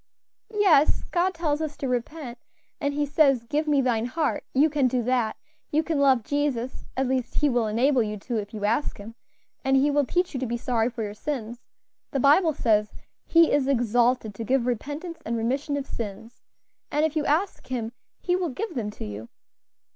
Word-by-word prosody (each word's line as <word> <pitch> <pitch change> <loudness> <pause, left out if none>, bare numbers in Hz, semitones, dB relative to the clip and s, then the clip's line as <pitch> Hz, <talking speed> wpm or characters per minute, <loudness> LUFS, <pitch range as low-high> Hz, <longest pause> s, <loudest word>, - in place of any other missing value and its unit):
"Yes, 385 -9 +4
God 365 +1 +1
tells 310 -3 -1
us 305 -2 -4
to 280 -2 -3
repent; 250 0 -4 0.4
and 285 -1 -1
He 295 0 +1
says, 280 -4 +3
'Give 300 +6 -1
me 290 -2 +3
thine 235 -3 +1
heart;' 305 +3 -1
you 280 +4 +4
can 290 -4 +2
do 250 -1 0
that; 240 -2 0 0.3
you 310 +2 +1
can 315 -2 -1
love 265 -4 +4
Jesus; 265 -2 -2
at 265 0 +1
least 255 -1 -1
He 295 - +3
will 240 -3 +1
enable 250 +5 +2
you 210 -1 -2
to, 230 +4 -4
if 205 -1 -4
you 210 -2 -4
ask 230 +8 0
Him, 210 +3 -9 0.5
and 270 0 +3
He 285 +2 +3
will 285 -2 +2
teach 360 +4 0
you 265 - -2
to 260 - -2
be 235 +1 -2
sorry 235 -1 0
for 235 -2 -5
your 205 -1 -4
sins; 240 -1 -4 0.5
the 275 - -1
Bible 305 +4 +4
says, 210 -4 +2 0.3
'He 335 -1 +5
is 280 -2 +2
exalted 245 -3 +2
to 225 - -6
give 255 +2 +1
repentance 290 +8 -4
and 230 +1 -2
remission 270 +6 -1
of 280 - -3
sins;' 225 0 -7 0.5
and 300 +2 +2
if 315 0 -2
you 305 - +1
ask 340 +7 0
Him 235 -3 -3 0.3
He 360 - 0
will 360 -2 -1
give 350 - -4
them 225 -5 -2
to 210 - -8
you. 105 +2 -7
265 Hz, 200 wpm, -25 LUFS, 235-295 Hz, 0.5 s, He